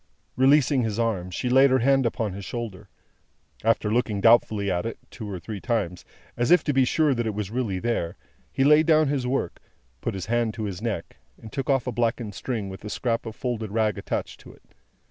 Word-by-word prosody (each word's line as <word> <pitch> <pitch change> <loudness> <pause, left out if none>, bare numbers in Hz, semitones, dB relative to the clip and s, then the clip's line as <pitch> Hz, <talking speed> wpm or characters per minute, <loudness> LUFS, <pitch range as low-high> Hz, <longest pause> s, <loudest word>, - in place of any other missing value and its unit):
Releasing 135 0 +4
his 110 -3 -2
arm, 110 -6 -1
she 90 +7 -3
laid 135 +2 +6
her 130 - +4
hand 135 0 +3
upon 110 -3 -2
his 100 +1 -7
shoulder. 115 -4 -6 0.7
After 110 -1 +2
looking 115 -4 0
doubtfully 110 -3 +4
at 90 -1 0
it, 115 0 -4
two 110 -4 -7
or 95 - -4
three 100 +3 -7
times, 100 -8 -2 0.3
as 120 0 0
if 180 - +6
to 145 - 0
be 135 -1 +4
sure 150 +2 +2
that 120 -2 -1
it 105 - -3
was 105 -2 -4
really 115 -6 -1
there, 90 -5 -2 0.3
he 135 - +1
laid 150 +2 +5
down 155 -2 +4
his 135 -3 -1
work, 135 +2 -2 0.4
put 115 - -3
his 95 - -4
hand 115 -2 0
to 110 - -4
his 100 -2 -4
neck, 110 -7 -4 0.2
and 110 - -11
took 135 +1 -4
off 135 -3 +2
a 125 - -2
blackened 115 -2 -1
string 110 -2 -3
with 95 0 -9
a 105 - -6
scrap 115 +1 -2
of 110 - -7
folded 115 -4 -3
rag 110 -1 +1
attached - - -4
to - - -13
it. - - -21
115 Hz, 220 wpm, -25 LUFS, 105-130 Hz, 0.7 s, laid